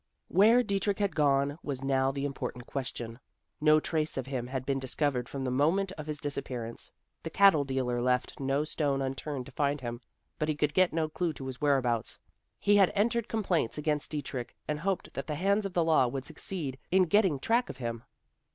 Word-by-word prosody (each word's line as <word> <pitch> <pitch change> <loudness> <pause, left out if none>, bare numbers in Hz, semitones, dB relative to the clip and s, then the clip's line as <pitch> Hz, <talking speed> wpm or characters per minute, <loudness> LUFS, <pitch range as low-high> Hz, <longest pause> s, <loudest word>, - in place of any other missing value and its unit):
Where 225 +6 +6
Dietrich 200 -1 0
had 200 -2 0
gone, 145 0 +2
was 135 -2 -4
now 135 -1 +2
the 140 +1 -3
important 130 -3 -4
question. 120 -3 -5 0.4
No 155 0 +6
trace 155 -1 -1
of 130 - -2
him 130 -3 -3
had 130 0 -4
been 135 0 0
discovered 130 -1 -1
from 135 -1 -4
the 130 - -1
moment 165 +9 +2
of 155 -5 -8
his 150 -1 -2
disappearance. 130 -5 -5 0.3
The - - -5
cattle 185 -4 +5
dealer 130 -3 -1
left 125 0 0
no 135 +2 +1
stone 145 -3 0
unturned 135 0 -4
to 140 - -11
find 145 +1 0
him, 120 -1 -5 0.4
but 155 - 0
he 155 - +1
could 150 0 0
get 185 +1 +4
no 160 -1 0
clue 165 +1 -2
to 135 - -8
his 130 -1 -6
whereabouts. 130 -6 +1 0.4
He 205 0 +4
had 195 -3 +5
entered 230 +2 +1
complaints 185 - 0
against 150 -1 -1
Dietrich, 140 -5 -5
and 150 0 -1
hoped 190 +3 -2
that 135 - -5
the 150 - -2
hands 200 +5 +1
of 190 - -11
the 175 - +3
law 155 -6 +4
would 130 +2 -4
succeed 155 -4 -5
in 190 +1 +5
getting 185 -3 +3
track 235 - +1
of - - -7
him. 115 -2 -4
145 Hz, 200 wpm, -30 LUFS, 130-170 Hz, 0.4 s, Where